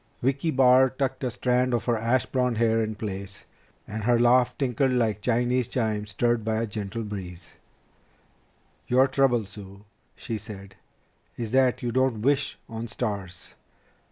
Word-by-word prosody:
Vicki 135 +5 +1
Barr 130 -2 +5
tucked 135 +1 -3
a 130 - 0
strand 125 +1 +1
of 115 - -2
her 120 - +2
ash 120 +3 +1
blond 125 -3 0
hair 115 0 +2
in 110 0 -4
place, 100 -2 -6 0.4
and 110 0 -5
her 120 0 +4
laugh 120 +1 +3
tinkled 130 0 +1
like 110 -4 0
Chinese 125 +1 +1
chimes 110 -4 -2
stirred 120 +3 0
by 110 0 -1
a 115 - 0
gentle 105 +1 -5
breeze. 95 -4 -8 1.3
"Your 130 +2 +5
trouble, 130 -4 +2
Sue," 100 0 -12 0.3
she 110 -2 -5
said, 100 -2 -10 0.6
"is 115 -3 -4
that 130 -1 +2
you 120 - -1
don't 130 -3 +1
wish 140 +1 +1
on 115 0 -6
stars. 95 -5 -5
115 Hz, 155 wpm, -26 LUFS, 105-125 Hz, 1.3 s, Barr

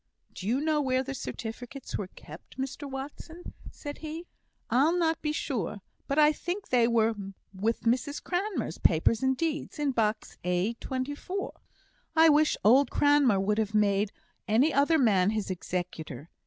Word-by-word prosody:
"Do 190 - -7
you 250 +5 +1
know 305 -1 +1
where 260 -1 +1
the 275 +1 -5
certificates 245 +1 -6
were 200 - -3
kept, 160 +2 -13
Mr 270 +2 -4
Watson?" 290 +5 -8 0.2
said 290 -1 -8
he. 320 +2 -6 0.5
"I'll 300 +8 +4
not 325 -2 +1
be 300 - -1
sure, 230 - -3 0.3
but 275 - -1
I 300 0 +6
think 360 +6 -5
they 240 -2 +4
were 230 -1 +3 0.4
with 215 +4 -1
Mrs 255 +5 0
Cranmer's 370 - -2
papers 170 +7 +3
and 265 0 +1
deeds 315 -1 -2
in 295 -2 +1
box 220 -3 -1
A, 180 +5 0
24." 290 +9 -4 0.6
"I 325 0 +7
wish 300 0 +4
old 260 +7 +6
Cranmer 285 -8 +4
would 210 +2 +1
have 215 -1 -1
made 205 0 +2 0.4
any 245 +9 +3
other 285 +4 +4
man 205 -8 +4
his 215 -3 -2
executor. 170 -5 -5
260 Hz, 155 wpm, -28 LUFS, 210-300 Hz, 0.6 s, I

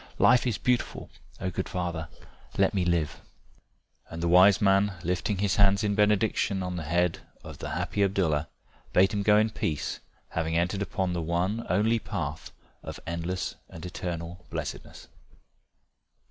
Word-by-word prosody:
Life 125 0 +5
is 115 -5 0
beautiful 125 +2 -1 0.3
O 95 - -2
good 95 - -3
father, 85 -3 -3 0.5
let - - +3
me 95 -3 +1
live." 85 -4 0 0.9
And 85 0 -6
the - - +1
wise 90 +3 +7
man 100 0 +3
lifting 90 +4 -1
his 100 0 0
hands 100 0 +4
in 105 -1 +1
benediction 105 -2 +2
on 90 0 -3
the 85 - -3
head 85 +2 +1 0.2
of - - -10
the - - -5
happy 100 - -2
Abdallah, 85 -7 +1 0.4
bade 95 +4 +4
him 100 - 0
go 105 +1 +5
in 110 +1 +3
peace, 75 -8 -2 0.3
having 80 0 -1
entered 90 +4 0
upon 95 -3 -1
the 85 - -1
one 90 +7 -1
only 115 +3 +2
path 95 -8 -5 0.3
of - - -7
endless 85 +2 -3 0.2
and 80 +1 -9
eternal 90 0 -5
blessedness. - - -6
95 Hz, 155 wpm, -28 LUFS, 85-100 Hz, 0.9 s, wise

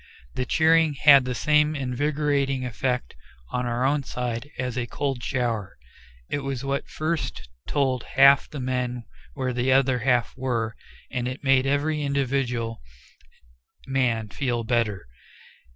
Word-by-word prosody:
The 125 - -3
cheering 160 -1 +3
had 140 -2 +7
the 125 0 -2
same 150 +3 +2
invigorating 140 0 0
effect 125 - -2 0.4
on 125 0 -1
our 120 +2 0
own 145 +2 +2
side 125 0 -4
as 125 -2 -3
a 125 -2 -2
cold 135 0 -3
shower; 115 - -2 0.5
it - - -2
was 135 -2 -4
what 140 0 -2
first 155 - -3 0.2
told 130 -4 +1
half 140 +1 +6
the 150 - -7
men 125 -1 -2 0.3
where 130 -1 -2
the 125 +2 +1
other 130 -1 +3
half 120 -1 +1
were, 120 -4 -2 0.4
and 125 -2 -2
it 130 +3 -6
made 135 -1 +3
every 150 +2 0
individual 135 - -1 1.0
man 120 -5 0
feel 120 +2 -2
better. 110 -4 0
130 Hz, 135 wpm, -25 LUFS, 120-140 Hz, 1.0 s, had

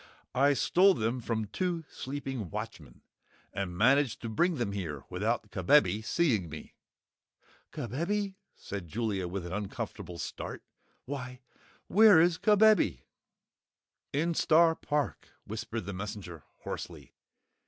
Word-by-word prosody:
"I 140 +3 +4
stole 185 +7 +4
them 115 +3 -1
from 110 -2 -2
two 170 - -2
sleeping 135 -7 -5
watchmen, 100 - -7 0.5
and 90 -3 -3
managed 130 +3 +3
to 115 - -3
bring 170 +10 +2
them 120 -7 -2
here 80 -9 -4
without - - -1
Kabebe 95 +4 +3
seeing 110 - +1
me." 80 +1 -9 1.0
"KABEBE?" 190 - -2 0.2
said 100 -4 -7
Jellia, 100 -1 -2
with 90 0 -4
an 85 - -6
uncomfortable 95 -3 -5
start. - - -6 0.4
"Why, 125 -2 -6 0.4
where 210 -4 +7
is 170 0 +3
Kabebe?" 210 - +4 1.1
"In 165 +4 0
Star 165 +1 +5
Park," 145 -6 -2 0.2
whispered 110 +2 -4
the 100 - -5
Messenger, 95 -4 -7 0.2
hoarsely. - - -7
120 Hz, 120 wpm, -30 LUFS, 100-160 Hz, 1.1 s, where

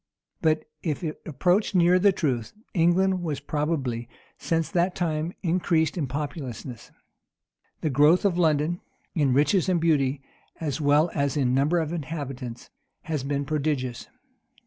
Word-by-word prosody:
But 155 -1 +2 0.2
if 160 +1 -2
it 155 -2 -4
approached 180 - +1
near 180 +1 +5
the 200 +2 +5
truth, 130 - -2 0.2
England 180 +1 +2
has 145 -3 -2
probably, 140 -5 -2 0.3
since 165 -2 0
that 180 +1 +1
time, 160 -1 -1
increased 165 -2 +1
in 155 -6 -1
populousness. 135 -4 -6 0.9
The 155 - 0
growth 150 +8 +4
of 190 -4 +3
London, 160 0 +1 0.3
in 145 -5 +2
riches 150 +8 +3
and 180 -2 +2
beauty, 140 -4 +1 0.4
as 155 -1 -2
well 150 +3 +3
as 140 0 0
in 125 -3 +2
numbers 150 +6 +2
of 155 +1 -5
inhabitants, 135 -7 -6 0.3
has 155 -5 -3
been 140 0 -1
prodigious. 140 -5 -2
155 Hz, 140 wpm, -26 LUFS, 140-170 Hz, 0.9 s, near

